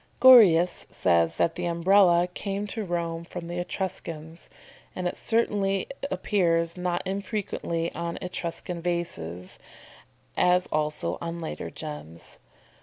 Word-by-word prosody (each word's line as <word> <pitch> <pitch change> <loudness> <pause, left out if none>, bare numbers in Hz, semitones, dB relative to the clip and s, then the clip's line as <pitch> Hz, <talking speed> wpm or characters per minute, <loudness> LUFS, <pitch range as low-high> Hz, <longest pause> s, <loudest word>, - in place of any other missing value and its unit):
"] - - -34
Gorius 200 -10 +7
says 85 -2 +2
that 165 - +1
the 175 +1 -3
Umbrella 175 0 +4
came 200 +1 -3
to 215 +1 -4
Rome 170 -2 -3
from 170 0 -7
the 175 +1 -4
Etruscans, 170 -3 -5 0.5
and 180 -1 -1
certainly 205 -4 +1
it 275 - -7
appears 170 -3 +1
not 180 -1 -2
infrequently 190 -4 -3
on 170 0 -4
Etruscan 175 -1 -5
vases, 95 - -4 0.8
as 180 0 +3
also 150 - -1
on 170 0 -4
later 160 - -5
gems. 150 - -9
175 Hz, 120 wpm, -26 LUFS, 165-190 Hz, 0.8 s, Gorius